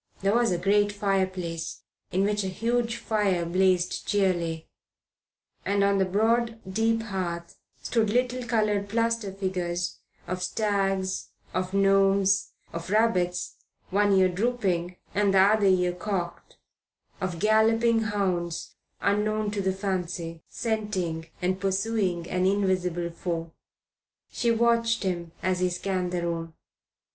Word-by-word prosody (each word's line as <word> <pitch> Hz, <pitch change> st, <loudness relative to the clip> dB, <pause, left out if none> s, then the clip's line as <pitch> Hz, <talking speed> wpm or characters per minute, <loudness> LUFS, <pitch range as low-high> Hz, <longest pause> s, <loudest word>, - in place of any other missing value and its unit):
There 195 Hz, +1 st, +2 dB
was 235 Hz, 0 st, +3 dB
a 175 Hz, -, +1 dB
great 205 Hz, +3 st, +3 dB
fireplace 185 Hz, -4 st, -2 dB, 0.3 s
in 190 Hz, +2 st, +2 dB
which 210 Hz, 0 st, +1 dB
a -, -, -2 dB
huge 235 Hz, +4 st, 0 dB
fire 205 Hz, -7 st, 0 dB
blazed 180 Hz, 0 st, +1 dB
cheerily, 175 Hz, -5 st, 0 dB, 1.0 s
and 200 Hz, +1 st, +1 dB
on 200 Hz, 0 st, +3 dB
the 190 Hz, -, +3 dB
broad, 225 Hz, +4 st, +1 dB
deep 225 Hz, +3 st, +1 dB
hearth 175 Hz, -5 st, -4 dB, 0.3 s
stood 225 Hz, -3 st, +1 dB
little 250 Hz, +2 st, +1 dB
coloured 210 Hz, -3 st, +1 dB
plaster 230 Hz, -2 st, 0 dB
figures 180 Hz, -2 st, -2 dB, 0.3 s
of 185 Hz, +1 st, -4 dB
stags, 195 Hz, -1 st, 0 dB, 0.3 s
of 185 Hz, +1 st, -2 dB
gnomes, 195 Hz, 0 st, +3 dB, 0.2 s
of 170 Hz, +1 st, -5 dB
rabbits, 185 Hz, -5 st, +1 dB, 0.3 s
one 205 Hz, +1 st, +3 dB
ear 190 Hz, -1 st, +5 dB
dropping, 185 Hz, -3 st, -1 dB, 0.2 s
the 200 Hz, -1 st, +3 dB
other 200 Hz, +2 st, +5 dB
ear 180 Hz, -2 st, +3 dB
cocked, 180 Hz, -2 st, -4 dB, 0.6 s
of 185 Hz, -2 st, -2 dB
galloping 225 Hz, +3 st, +3 dB
hounds 185 Hz, -5 st, -2 dB, 0.3 s
unknown 210 Hz, +1 st, +1 dB
to 205 Hz, -1 st, -2 dB
the 190 Hz, 0 st, +1 dB
fancy, 180 Hz, -4 st, -3 dB
scenting 195 Hz, -8 st, -2 dB, 0.2 s
and 185 Hz, +1 st, 0 dB
pursuing 195 Hz, -3 st, 0 dB
an 185 Hz, 0 st, +1 dB
invisible 185 Hz, -3 st, 0 dB
foe. 165 Hz, -1 st, -4 dB, 0.8 s
She 240 Hz, -, 0 dB
watched 230 Hz, 0 st, +2 dB
him 175 Hz, -3 st, -2 dB
as 185 Hz, 0 st, +1 dB
he 180 Hz, 0 st, +2 dB
scanned 180 Hz, 0 st, -2 dB
the 175 Hz, -1 st, -1 dB
room. 165 Hz, -1 st, -3 dB
195 Hz, 125 wpm, -27 LUFS, 180-215 Hz, 1.0 s, ear